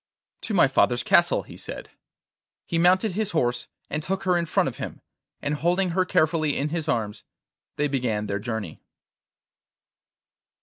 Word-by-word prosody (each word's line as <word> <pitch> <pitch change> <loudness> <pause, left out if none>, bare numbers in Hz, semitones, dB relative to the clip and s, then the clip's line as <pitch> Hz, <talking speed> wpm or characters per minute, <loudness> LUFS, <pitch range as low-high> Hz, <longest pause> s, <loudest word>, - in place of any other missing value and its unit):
'To 215 - -2
my 175 - +6
father's 120 -2 +2
castle,' - - +4
he - - -12
said. - - -8 0.7
He 165 - -1
mounted 185 +5 +4
his 210 +2 -2
horse 120 -4 0 0.2
and 150 - -2
took 190 +5 -3
her 185 -2 +2
in 170 -1 0
front - - +2
of - - -5
him, - - -6 0.4
and, 145 +1 0
holding 175 +4 +1
her 185 +2 +1
carefully 155 -3 +2
in 145 +2 -1
his 165 0 -3
arms, 110 -3 -1 0.5
they 150 - +1
began 120 -7 -1
their 100 -1 -2
journey. 110 -6 -5
150 Hz, 160 wpm, -25 LUFS, 120-180 Hz, 0.7 s, my